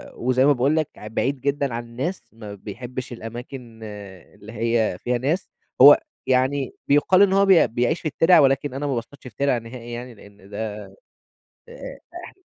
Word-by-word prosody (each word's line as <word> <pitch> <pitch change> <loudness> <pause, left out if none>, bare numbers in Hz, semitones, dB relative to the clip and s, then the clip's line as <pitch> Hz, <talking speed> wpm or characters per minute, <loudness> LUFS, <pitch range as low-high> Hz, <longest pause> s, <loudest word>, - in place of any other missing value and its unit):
وزي 130 +2 +1
ما 145 - +5
باقول 135 +4 +1
لك 155 -3 0
ع 105 - -9
بعيد 130 +5 -2
جدًا 140 -2 -1
عن 120 0 -4
الناس، 130 +11 -4
ما 105 -2 -9
بيحبش 120 +5 -7
الأماكن 120 0 -9
اللي 105 0 -11
هي 115 -4 0
فيها 125 0 -1
ناس، 150 +9 -1 0.3
هو 145 +2 +10 0.3
يعني 130 +1 +1
بيُقال 160 +7 +4
إن 195 -1 +5
هو 200 0 +4
بي 190 -4 +5
بيعيش 120 +8 -1
في - - -3
التِرَع، 165 +4 +4
ولكن 135 0 +2
أنا 145 +2 -3
ما 135 - -1
باصطادش 120 +4 -7
في 110 - -13
تِرَع 140 -3 +1
نهائي 120 +1 -9
يعني، 120 +1 -7
لإن 100 -1 -17
ده 105 0 -5 0.9
آآ - - -10 0.3
اح 380 - -15
125 Hz, 175 wpm, -22 LUFS, 115-145 Hz, 0.9 s, هو